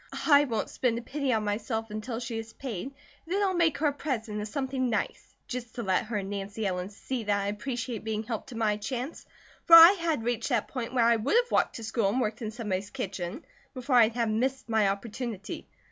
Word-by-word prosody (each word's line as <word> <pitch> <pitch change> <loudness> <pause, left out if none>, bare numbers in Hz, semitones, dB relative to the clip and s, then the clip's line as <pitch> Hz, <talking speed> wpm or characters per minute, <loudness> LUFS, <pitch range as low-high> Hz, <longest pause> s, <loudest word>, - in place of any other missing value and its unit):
I 290 -1 +6
won't 230 -5 -2
spend 240 -3 0
a 235 - -5
penny 280 0 -2
on 220 -3 +1
myself 220 +1 -2
until 220 +2 -4
she 235 -2 -4
is 225 0 -8
paid, 235 -8 -5
and 275 - -11 0.4
then 405 - +2
I'll 385 -2 +2
make 335 -3 +2
her 310 - -1
a 290 - +3
present 225 -8 -3
of 210 - -4
something 260 +1 -1
nice, 225 - -3
just 245 -3 -6
to 235 - -3
let 190 +1 +1
her 215 -1 -3
and 195 -1 -3
Nancy 205 +2 -4
Ellen 180 -1 -2
see 235 +4 -5
that 205 -1 +2
I 200 - -2
appreciate 230 +1 -4
being 220 0 -2
helped 225 +3 -5
to 240 - -7
my 215 -2 +1
chance, 250 +7 -5 0.4
for 330 - +9
I 330 +2 +12
had 335 - -1
reached 240 +2 -1
that 240 -5 0
point 250 -1 -5
where 235 -2 +4
I 235 0 +5
would 245 - 0
have 485 0 +3
walked - - +2
to 230 - -6
school 220 -2 0
and 240 +6 0
worked 220 -1 -2
in 220 - -3
somebody's 205 -4 -3
kitchen, 200 - -5 0.3
before 255 +1 -1
I'd 230 -1 +6
have 235 -2 +1
missed 260 +4 -1
my 220 -3 +3
opportunity. 210 +1 -4
230 Hz, 230 wpm, -28 LUFS, 210-260 Hz, 0.4 s, I